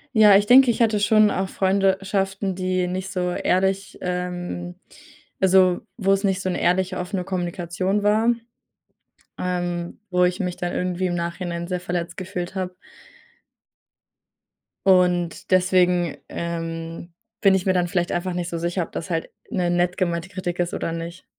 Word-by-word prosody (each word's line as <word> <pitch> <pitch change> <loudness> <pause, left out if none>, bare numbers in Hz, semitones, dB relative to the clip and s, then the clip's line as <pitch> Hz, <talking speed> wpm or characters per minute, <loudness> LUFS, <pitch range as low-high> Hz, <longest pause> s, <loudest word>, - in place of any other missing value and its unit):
Ja, 210 -2 +8
ich 200 +1 +5
denke, 255 +3 +7
ich 235 - -3
hatte 215 -2 +3
schon 215 0 +4
auch 190 0 -1
Freunde 190 0 +2
schaften, 195 0 -1
die 185 0 -1
nicht 185 +2 -4
so 180 -2 -1
ehrlich 190 +2 0
ähm, 175 - -4 0.6
also, 185 -1 +4 0.2
wo 195 -3 +1
es 195 0 +2
nicht 190 -1 +1
so 190 - -2
'ne - - -2
ehrliche, 185 +1 +1
offene 180 +1 -3
Kommunikation 185 +2 -2
war. 215 +3 +3 1.1
Ähm, 175 -1 -3
wo 180 0 +3
ich 180 +2 0
mich 180 -2 -2
dann 175 0 -3
irgendwie 180 0 -1
im 175 - -1
Nachhinein 170 0 -3
sehr 180 -1 -2
verletzt 175 -1 -3
gefühlt 185 -1 -5
habe. 185 -1 -3 2.1
Und, 180 -3 +2
deswegen, 180 -2 +3
ähm, 165 0 -5 0.3
bin 195 -1 +5
ich 185 - -1
mir 190 - +3
dann 180 -1 +1
vielleicht 175 -1 -1
einfach 180 +1 -2
nicht 175 0 -3
so 170 - -3
sicher, 175 +2 -1
ob - - -11
das 170 - -5
halt 165 -2 -2 0.2
'ne 180 -2 0
nett 175 +1 +1
gemeinte 170 -1 -1
Kritik 185 -2 -4
ist, 175 0 0
oder - - -2
nicht. 165 +2 -6
180 Hz, 165 wpm, -23 LUFS, 175-190 Hz, 2.1 s, Ja